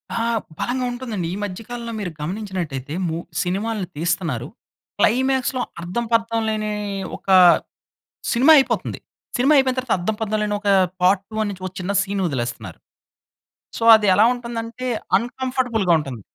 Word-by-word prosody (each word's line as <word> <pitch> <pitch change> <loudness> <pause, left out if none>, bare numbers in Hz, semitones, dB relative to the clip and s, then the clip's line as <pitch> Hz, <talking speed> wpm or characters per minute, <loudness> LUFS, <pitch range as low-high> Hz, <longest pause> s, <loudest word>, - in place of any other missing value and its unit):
ఆ! - - -1 0.4
బలంగా 250 +1 -1
ఉంటుందండి. 235 -8 -4
ఈ - - -3
మధ్య 200 0 -5
కాలంలో 235 -1 -5
మీరు 190 -4 -4
గమనించినట్లయితే, 170 - -4
మూ 160 0 -2 0.3
సినిమాలని 195 +2 -2
తీస్తున్నారు, 165 -7 -1 0.5
క్లైమాక్స్‌లో 260 +2 +2 0.2
అర్థం 180 +8 -3
పర్థం 230 0 +1
లేని 215 -1 -2 0.5
ఒక - - -12 1.0
సినిమా 265 +7 +6
అయిపోతుంది. 270 - 0 0.4
సినిమా 270 +4 +3
అయిపోయిన 265 -2 +3
తర్వాత 255 -2 0
అర్ధం 180 +5 -1
పర్థం 215 -1 -1
లేని 210 0 -1
ఒక 205 - -3 0.3
పార్ట్ 190 +1 +4
1 215 -1 0
నుంచి 190 -2 -9
ఒక 185 - -7
చిన్న 185 +2 -2
సీన్ 195 0 -2
వదిలేస్తున్నారు. 120 - -4 1.0
సో, - - -3
అది 215 -1 +1
ఎలా 210 - +6
ఉంటుందంటే, 235 0 -5 0.3
అన్‌కంఫోర్టబుల్‌గా 245 -4 0
ఉంటుంది. 135 -7 -6
215 Hz, 140 wpm, -21 LUFS, 180-240 Hz, 1.0 s, సినిమా